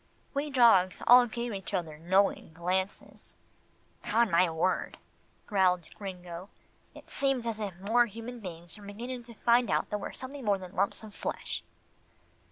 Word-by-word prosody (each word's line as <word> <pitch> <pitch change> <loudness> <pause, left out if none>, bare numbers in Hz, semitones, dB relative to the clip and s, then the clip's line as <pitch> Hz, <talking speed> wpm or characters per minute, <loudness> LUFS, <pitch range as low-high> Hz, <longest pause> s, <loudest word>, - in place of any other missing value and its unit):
We 290 +1 -1
dogs 230 -9 +5
all 245 0 +8
gave 235 0 -4
each 195 0 -4
other 160 -4 -3
knowing 190 0 +2
glances. 185 +3 -3 0.7
"'Pon 230 -1 +2
my 170 +1 +4
word," 165 +3 -1 0.5
growled 185 -4 +2
Gringo, 180 -2 -8 0.5
"it - - -13
seems 270 -3 0
as 225 -2 -2
if 200 -4 -4
more 235 +5 +3
human 230 +3 -8
beings 175 -4 -8
were 205 - -12
beginning 240 +5 -6
to 235 -1 -12
find 240 +2 +3
out - - 0
that 210 - -1
we're - - -6
something 265 +1 -7
more 205 -3 +2
than 185 -1 -10
lumps 200 +4 0
of 215 -2 -10
flesh." - - -4
205 Hz, 160 wpm, -30 LUFS, 185-235 Hz, 0.7 s, all